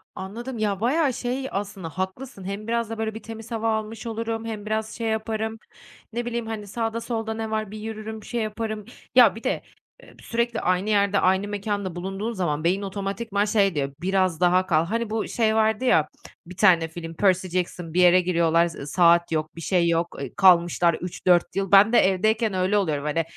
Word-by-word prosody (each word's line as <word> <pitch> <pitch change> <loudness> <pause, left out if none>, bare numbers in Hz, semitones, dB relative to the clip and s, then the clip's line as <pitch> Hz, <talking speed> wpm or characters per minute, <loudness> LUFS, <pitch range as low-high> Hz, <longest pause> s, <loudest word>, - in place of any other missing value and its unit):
Anladım 235 +7 -6
ya 205 -3 -1
bayağı 270 +5 +2
şey 255 +2 -3
aslında 195 -3 -4
haklısın, 190 - -5
hem 200 +3 -5
biraz 230 -1 -1
da 225 - -5
böyle 220 0 -2
bir 220 - -8
temiz 225 0 -9
hava 225 0 -1
almış 220 +1 -6
olurum, 225 0 -3
hem 215 -2 -5
biraz 220 0 -2
şey 230 -1 -3
yaparım 220 0 -2 0.6
ne 240 +1 -2
bileyim 235 -1 -3
hani 215 -2 -5
sağda 225 +2 -3
solda 225 -2 -3
ne 220 0 -4
var 215 -2 -2
bir 215 - -7
yürürüm 220 0 -6
şey 240 +2 -3
yaparım 215 -1 -4 0.3
ya 240 -6 +7
bir 225 - -10
de, - - -1 0.4
eee, - - -16
sürekli 235 0 -1
aynı 185 +3 0
yerde 200 -1 +3
aynı 190 +2 +2
mekânda 205 -3 -3
bulunduğun 195 +5 -4
zaman 160 -7 -2
beyin 185 +4 +1
otomatikman 200 +1 -2
şey 200 -4 +2
diyor, 140 -1 -2
"Biraz 185 -2 +1
daha 180 +1 +3
kal." 165 -3 +2
Hani 230 +4 -2
bu 220 0 -2
şey 220 -2 +1
vardı 220 +2 +2
ya 155 -11 +4 0.4
bir 180 +1 -12
tane 175 -5 +5
film 165 0 -8
Percy 185 +1 +2
Jackson 175 -2 -3
bir 180 - +3
yere 180 +1 +6
giriyorlar, 170 -2 +2
ııı, 140 - -8
z - - -7
saat 170 0 +4
yok, 155 0 -2
bir 165 - -8
şey 175 0 +2
yok, 170 +1 0
eee, 135 - -6
kalmışlar 175 -2 +5
3-4 175 0 +1
yıl. 195 -1 -2
Ben 200 +4 +7
de - - +7
evdeyken 215 +3 +2
öyle 185 +2 +1
oluyorum, 155 -8 0
hani 160 +2 0
205 Hz, 200 wpm, -24 LUFS, 180-225 Hz, 0.6 s, ya